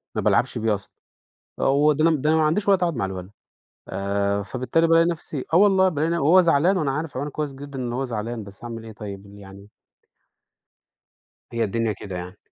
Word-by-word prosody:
ما - - 0
بالعبش - - +2
بيه 110 -1 +1
أصلًا، 100 - -11 0.7
و 145 +3 +3
ده 155 +3 +3
أنا 160 - +3
ده 150 +3 0
أنا 160 - +3
ما 155 - +3
عنديش 185 +7 0
وقت 195 -2 +4
أقعُد 170 -6 +1
مع 115 - -1
الولد، 95 0 -6 0.6
ف - - -11 0.6
فبالتالي 130 +6 +1
بالاقي 165 0 +5
نَفْسي 155 -5 -4
آه - - +5
والله، 190 -1 +5
بالاقي 160 0 -1
ن - - +1
وهو 170 +3 +5
زعلان 170 +2 +3
وأنا 155 -6 0
عارف 150 +1 -4
عيونه 145 +2 -3
كويس 150 -1 -4
جدًا 140 0 -8
إن 125 -2 -3
هو 130 +3 -2
زعلان، 115 -2 -4
بس 100 +3 -13
هاعمل 115 -1 -7
إيه 110 - -9
طيب 100 -2 -8
يعني. 100 0 -13 1.8
هي 115 -1 0
الدنيا 115 +1 -1
كده 95 -2 -7
يعني. 90 +2 -7
135 Hz, 200 wpm, -23 LUFS, 110-160 Hz, 1.8 s, بالاقي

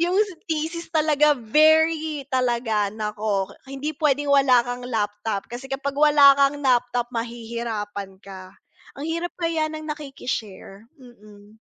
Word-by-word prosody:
yung 355 +2 0 0.3
thesis 325 +2 -3
talaga 300 -1 +3
very 310 +3 +2
talaga 235 -5 0
naku, 210 -2 -2 0.2
hindi 275 +3 -5
puwedeng 290 -1 +1
wala 270 -3 +5
kang 245 +1 -5
laptop 210 -3 -3
kasi 245 +3 -8
kapag 275 +1 -3
wala 290 -2 +6
kang 280 +1 +2
laptop 245 -2 +1
mahihirapan 225 -4 -5
ka, 190 -1 -11 0.4
ang 280 - -8
hirap 335 +2 -3
kaya 330 -2 0
ng 310 0 -7
nakiki-share, 245 -9 -6 0.2
mm. 215 -3 -17
255 Hz, 125 wpm, -23 LUFS, 220-300 Hz, 0.4 s, wala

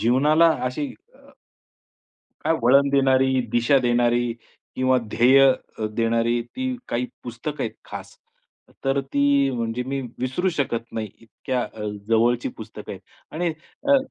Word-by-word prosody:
जीवनाला 150 +8 +4 0.2
अशी 130 +4 -2 0.3
अ, - - -22 1.3
काय 165 - +2
वळण 140 +4 +5
देणारी, 130 -1 +3
दिशा 120 +4 +3
देणारी 120 -1 +2 0.4
किंवा 130 0 +3
ध्येय 130 +4 +5 0.4
अ, 110 - -2
देणारी 115 +1 +1
ती 260 0 -2
काही 120 +1 -1 0.2
पुस्तकं 125 +5 -5
आहेत - - -3
खास. - - -9 0.7
तर 135 +1 +2
ती 140 0 +2
म्हणजे 120 0 -2
मी 135 +1 -3 0.2
विसरू 130 +9 0
शकत 115 -5 -2
नाही 110 -2 -3
इतक्या 125 +3 -4
अ, 110 - -9 0.3
जवळची 115 +2 +2
पुस्तकं 110 -1 -9
आहेत 95 - -8 0.3
आणि 170 +2 0 0.4
अ - - +7
125 Hz, 130 wpm, -23 LUFS, 120-140 Hz, 1.3 s, अ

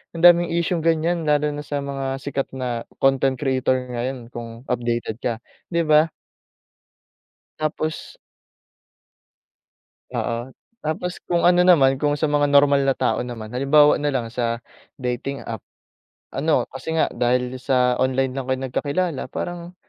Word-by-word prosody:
ang 165 - -5
daming 175 0 +7
isyung 170 +1 0
ganyan 165 0 +1
lalo 150 0 +2
na 145 - -5
sa 145 -1 -3
mga 135 -1 -3
sikat 140 -1 -2
na 125 -3 -3 0.2
content 135 0 +3
creator 130 -2 +1 0.2
ngayon 120 0 -4
kung 115 0 -8
updated 120 -2 -2
ka, 120 - -1 0.3
di 170 -1 0
ba? 155 +1 +4 1.5
Tapos 155 +1 -3 2.0
Oo. 120 +2 -2 0.3
Tapos 175 +2 -3
kung 175 -1 +1
ano 175 0 +5
naman, 135 -7 +5
kung 145 -1 +2
sa 150 0 0
mga 145 0 +2
normal 140 0 +5
na 135 - +3
tao 130 - 0
naman, 120 -3 -6
halimbawa 145 +4 +5
na 145 - 0
lang 115 -3 -2
sa 115 -1 -2 0.3
dating 125 +2 -3
app. 115 -2 -5 0.7
Ano, 155 +2 +1
kasi 135 +5 -5
nga 160 - +2
dahil 125 +1 +1
sa 125 -1 +2
online 130 0 +1
lang 135 -1 -4
kayo 130 0 +1
nagkakilala 145 +5 -1
parang 175 +4 -5
135 Hz, 140 wpm, -22 LUFS, 125-155 Hz, 2.0 s, daming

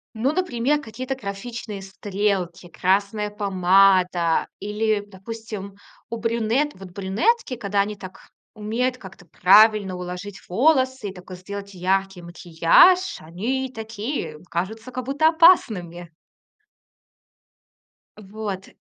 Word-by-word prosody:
Ну, 250 +6 +1
например, 295 -4 0
какие-то 255 +3 -5
графичные 210 -1 -7
стрелки, 190 -2 -3
красная 200 +4 0
помада 185 -3 +3
или, 210 +1 -1
допустим, 205 0 -8 0.3
у 230 - -4
брюнет 230 +5 0
вот 190 -1 -12
брюнетки, 250 - 0
когда 200 -3 0
они 210 +1 -3
так 185 -2 -12 0.3
умеют 235 +4 -2
как-то 190 -5 -13
правильно 200 +2 +5
уложить 180 +2 -7
волосы 260 - +2
и - - -9
такой 180 0 -11
сделать 200 +2 -8
яркий 190 0 -1
макияж, 175 - +4
они 240 +11 -3
такие 220 - -5
кажутся 220 +8 -4
как 255 0 -5
будто 285 +4 +2
опасными! 200 - +3 2.1
Вот. 200 -1 -6
205 Hz, 105 wpm, -23 LUFS, 190-235 Hz, 2.1 s, правильно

